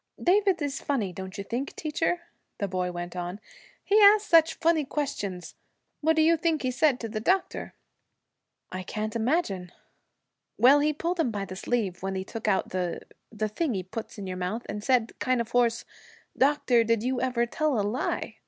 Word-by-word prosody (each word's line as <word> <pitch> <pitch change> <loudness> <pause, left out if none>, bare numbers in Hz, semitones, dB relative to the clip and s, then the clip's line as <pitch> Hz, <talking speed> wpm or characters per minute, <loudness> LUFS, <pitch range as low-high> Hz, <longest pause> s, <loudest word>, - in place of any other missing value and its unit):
'David 385 0 +3
is 280 -1 -3
funny, 220 -10 -1
don't 190 +2 -7
you 200 - -4
think, 245 +7 -4
teacher?' 325 +3 -1 0.4
the 200 - -2
boy 180 -1 -2
went 175 0 -6
on. 180 +2 -4 0.4
'He 420 +2 +4
asks 415 +1 +7
such 325 -1 +5
funny 330 -2 +2
questions. 210 - -4 0.5
What 320 +1 +2
do 315 - +4
you 330 +1 +4
think 320 -2 0
he 255 - 0
said 255 0 +2
to 230 - -3
the 215 0 -4
doctor?' 375 - -1 1.0
'I 185 - -4
can't 215 +4 -4
imagine.' 220 - 0 0.9
'Well, 275 +4 +7
he 300 +1 +2
pulled 340 +4 -3
him 315 - +2
by 205 -3 -3
the 185 -1 -8
sleeve 195 -3 -2
when 190 0 -3
he 190 - -2
took 220 +1 -6
out 195 -2 +1
the 180 -2 -2 0.3
the 215 -1 -2
thing 245 +4 -1
he 185 - -2
puts 215 +6 -7
in 200 - -6
your 185 -1 -4
mouth, 185 +6 -3
and 210 0 -5
said 245 -3 +2
kind 255 -1 +1
of 235 0 -3
hoarse, 240 -1 +2 0.5
"Doctor, 265 -4 +3
did 230 -1 +1
you 255 0 -1
ever 250 -2 +1
tell 285 0 0
a - - +1
lie?" 235 +5 -2
235 Hz, 190 wpm, -27 LUFS, 195-305 Hz, 1.0 s, asks